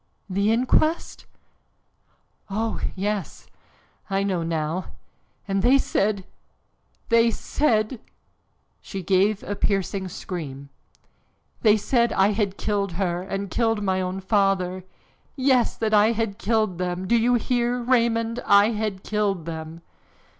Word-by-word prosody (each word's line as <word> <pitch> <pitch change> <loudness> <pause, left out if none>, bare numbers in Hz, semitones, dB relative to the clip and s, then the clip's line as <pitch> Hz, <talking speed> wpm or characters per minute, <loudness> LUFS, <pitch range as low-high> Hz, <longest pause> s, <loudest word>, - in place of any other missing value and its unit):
"The 200 +2 +1
inquest? 255 +7 +1 1.2
Oh, 220 +2 -2 0.2
yes, 200 -1 -3 0.6
I 195 0 0
know 190 -3 -1
now, 165 +2 -3 0.5
and 195 -1 0
they 255 +6 +5
said 200 -6 0 0.8
they 230 0 +5
said 225 -2 0 0.4
" - - -45
She 195 -1 -6
gave 195 +3 +2
a 205 - -4
piercing 195 -1 -1
scream. 140 -7 -7 0.9
"They 215 -1 +5
said 235 +2 +1
I 195 +2 +3
had 200 -2 -1
killed 200 -3 -1
her 175 -1 -1
and 195 0 -4
killed 225 -3 +1
my 190 -1 0
own 185 +1 -3
father! 190 -2 +1 0.5
Yes, 260 -3 +2
that 220 -1 -1
I 215 +2 +5
had 225 -2 -2
killed 215 -6 0
them! 180 0 -2
Do 235 - +3
you 240 +2 +3
hear, 240 +1 0
Raymond, 235 -1 +1
I 200 +2 +6
had 210 -3 -3
killed 200 -5 -1
them!" 160 0 -7
205 Hz, 125 wpm, -24 LUFS, 185-225 Hz, 1.2 s, I